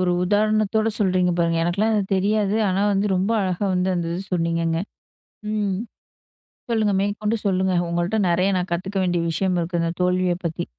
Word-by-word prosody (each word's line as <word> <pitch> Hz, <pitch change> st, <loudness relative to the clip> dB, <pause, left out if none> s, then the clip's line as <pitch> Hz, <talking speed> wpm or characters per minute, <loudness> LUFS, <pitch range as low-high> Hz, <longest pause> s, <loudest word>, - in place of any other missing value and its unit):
ஒரு 180 Hz, -1 st, +1 dB
உதாரணத்தோட 215 Hz, +2 st, +2 dB
சொல்றீங்க 185 Hz, -3 st, +2 dB
பாருங்க. 165 Hz, -1 st, +1 dB
எனக்குலாம் 200 Hz, +6 st, +1 dB
இது 210 Hz, -, +2 dB
தெரியாது, 205 Hz, +1 st, +1 dB
ஆனா 190 Hz, +2 st, +1 dB
வந்து 200 Hz, +1 st, +1 dB
ரொம்ப 190 Hz, +4 st, 0 dB
அழகா 185 Hz, 0 st, -1 dB
வந்து 180 Hz, +1 st, +1 dB
அந்த 170 Hz, -1 st, -2 dB
இத 175 Hz, -, -3 dB
சொன்னீங்கங்க. 165 Hz, -1 st, 0 dB, 0.7 s
ம் 205 Hz, -3 st, 0 dB, 1.0 s
சொல்லுங்க, 215 Hz, -3 st, +1 dB
மேற்கொண்டு 210 Hz, +2 st, -1 dB
சொல்லுங்க. 190 Hz, -1 st, +1 dB, 0.2 s
உங்கள்ட்ட 175 Hz, +5 st, -1 dB
நெறைய 180 Hz, +2 st, +2 dB
நான் 180 Hz, 0 st, -3 dB
கத்துக்க 190 Hz, +3 st, -2 dB
வேண்டிய 175 Hz, -2 st, 0 dB
விஷயம் 185 Hz, +2 st, 0 dB
இருக்குதுங்க 170 Hz, 0 st, -1 dB
தோல்விய 180 Hz, 0 st, +2 dB
பத்தி. 165 Hz, -1 st, -2 dB
185 Hz, 155 wpm, -22 LUFS, 175-205 Hz, 1.0 s, உதாரணத்தோட